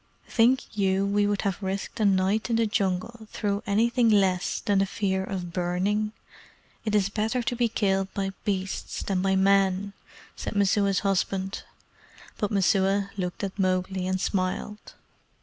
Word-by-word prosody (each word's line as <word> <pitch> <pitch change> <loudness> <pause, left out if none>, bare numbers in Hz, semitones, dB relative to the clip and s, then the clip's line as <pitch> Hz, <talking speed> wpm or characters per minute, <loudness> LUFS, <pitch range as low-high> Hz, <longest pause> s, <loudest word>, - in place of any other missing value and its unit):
"Think 245 +1 +2
you 195 -1 +1
we 205 +1 +2
would 205 -1 0
have 195 -1 -2
risked 195 +3 -4
a 215 - +2
night 195 +3 +2
in 230 - +2
the 230 0 +3
Jungle 210 +3 -2
through 205 -1 -1
anything 230 +3 +3
less 190 -4 +2
than 205 -3 +1
the 195 - +2
fear 190 -1 -1
of 180 -3 -5
burning? 190 +4 0 0.7
It 215 -2 0
is 200 -2 +2
better 220 +4 -1
to 240 +1 -1
be 240 -1 +1
killed 195 -3 0
by 195 -1 -1
beasts 195 -2 -3
than 190 -2 -1
by 190 0 +2
men," 195 0 +2 0.4
said - - -5
Messua's 200 -1 +2
husband; 195 -1 -1 0.8
but 210 - 0
Messua 195 0 +2
looked 180 0 -4
at 195 +1 -4
Mowgli 185 0 0
and 185 0 0
smiled. 190 +3 -3
195 Hz, 155 wpm, -26 LUFS, 190-210 Hz, 0.8 s, the